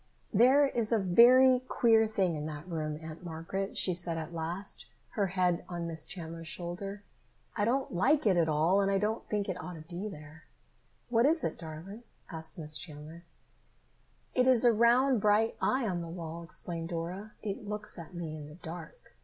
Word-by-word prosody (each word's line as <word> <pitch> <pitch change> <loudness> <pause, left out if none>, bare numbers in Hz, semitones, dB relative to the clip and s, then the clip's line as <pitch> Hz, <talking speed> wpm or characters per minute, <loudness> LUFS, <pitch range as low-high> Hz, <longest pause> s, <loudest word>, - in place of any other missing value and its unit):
"There 260 +7 +6
is 235 -4 -2
a 230 - +4
very 250 +7 +6
queer 230 -3 +3
thing 190 -6 0
in 150 0 -4
that 150 +2 -7
room, 155 -3 -3
Aunt 160 +2 -9
Margaret," 175 +4 -4
she 185 - +3
said 170 -1 -1
at 160 +1 -5
last, 170 +5 -3 0.2
her 200 -3 0
head 180 -2 +1
on 175 -1 -4
Miss 160 -2 0
Chandler's 165 -2 -5
shoulder. 190 +5 -5 0.5
"I 205 - +1
don't 260 +1 0
like 265 - +3
it 195 -4 +4
at 165 -2 +2
all 160 +6 +3
and 195 - +1
I 195 - +2
don't 215 +3 -1
think 205 -2 -1
it 180 -2 -3
ought 180 +1 -7
to 160 - -9
be 175 +6 -6
there." 155 -2 -12 0.6
"What 235 +2 +4
is 320 +2 +2
it, - - -1
darling?" 170 +7 -8 0.3
asked 160 -1 -1
Miss 155 -2 -1
Chandler. 155 +2 -10 1.1
"It 255 0 +3
is 250 -2 +5
a 240 - +6
round 240 +2 +4
bright 215 +2 +3
eye 260 -1 +1
on 175 -3 -2
the 165 - -6
wall," 165 -1 -6
explained 170 -1 -4
Dora. 180 +5 -5
"It 205 0 -4
looks 210 -2 -4
at 170 +2 -10
me 165 -3 -5
in 150 -2 -8
the 150 - -12
dark. 175 - -10
180 Hz, 190 wpm, -31 LUFS, 165-215 Hz, 1.1 s, There